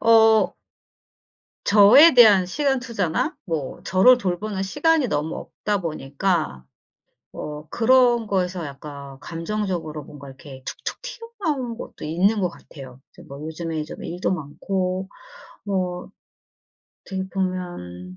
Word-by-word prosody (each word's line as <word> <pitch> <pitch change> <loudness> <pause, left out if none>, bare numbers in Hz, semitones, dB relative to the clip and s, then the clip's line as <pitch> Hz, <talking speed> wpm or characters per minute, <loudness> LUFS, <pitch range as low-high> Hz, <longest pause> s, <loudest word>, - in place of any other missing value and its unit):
어 225 -1 +5 1.1
저에 220 +11 +8
대한 210 -7 +7
시간 270 +6 0
투자나 235 - -2
뭐 160 -6 -4
저를 215 +8 +5
돌보는 195 -1 -2
시간이 290 +6 +2
너무 150 -2 -2
없다 205 -2 -3
보니까 155 - -2 0.7
뭐 150 0 -7
그런 240 -1 +4
거에서 180 -3 -1
약간 140 -1 -9
감정적으로 165 -2 -4
뭔가 140 0 -12
이렇게 135 0 -12
툭툭 - - -5
튀어나온 405 - -4
것도 - - -9
있는 185 +8 +1
것 180 - +1
같아요. 135 -6 -13
이제 - - -15
뭐 140 +1 -10
요즘에 160 -1 -4
좀 - - -9
일도 180 +2 -2
많고 185 +4 -3 0.6
뭐 185 -3 -3 0.9
어떻게 190 0 -5
보면 175 - -4
185 Hz, 250 characters per minute, -23 LUFS, 155-220 Hz, 1.1 s, 저에